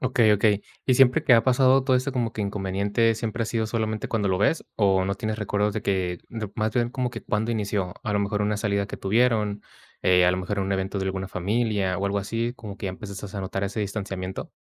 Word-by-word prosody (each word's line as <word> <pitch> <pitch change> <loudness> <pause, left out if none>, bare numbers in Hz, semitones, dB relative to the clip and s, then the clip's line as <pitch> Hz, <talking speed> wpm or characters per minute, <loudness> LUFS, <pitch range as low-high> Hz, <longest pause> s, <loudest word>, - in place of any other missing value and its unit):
Okey, 120 -4 +3
okey. 105 0 +3 0.2
Y, 130 - +4
¿siempre 130 0 +5
que 135 - +4
ha 115 - +4
pasado 130 +1 +4
todo 130 -2 +4
eso 130 +2 -1
como 120 -3 -1
que 110 - -5
inconveniente 100 +3 0
siempre 115 +1 -3
ha - - -6
sido 115 -1 -1
solamente 110 -1 -2
cuando 110 -3 0
lo 95 - +2
ves 130 +11 +2
o 95 -3 +3
no 100 +1 -1
tienes 110 0 -3
recuerdos 105 0 0
de 110 - -3
que 90 -3 -1
de 110 -3 -5
más 110 0 0
bien 120 -1 +2
como 125 0 -2
que, 115 -3 -7
¿cuándo 110 +4 -1
inició? 100 -4 -2
A 105 - -2
lo 105 - +2
mejor 100 +1 -1
una 105 0 0
salida 100 -1 0
que - - -7
tuvieron, 105 -1 +1 0.4
eh, 90 -1 +5
a 90 - +5
lo 90 - -1
mejor 95 +2 -3
un 95 0 -1
evento 95 +1 -2
de 95 - -2
alguna 95 0 -3
familia 100 0 0
o 100 - 0
algo 100 +1 0
así, 115 +4 -2
como 105 -3 -8
que, - - -4
¿ya 95 - -1
empezaste 100 0 -8
a 100 - -2
notar 95 +1 -3
ese 100 +2 -4
distanciamiento? 95 -2 -4
105 Hz, 240 wpm, -25 LUFS, 100-115 Hz, 0.4 s, siempre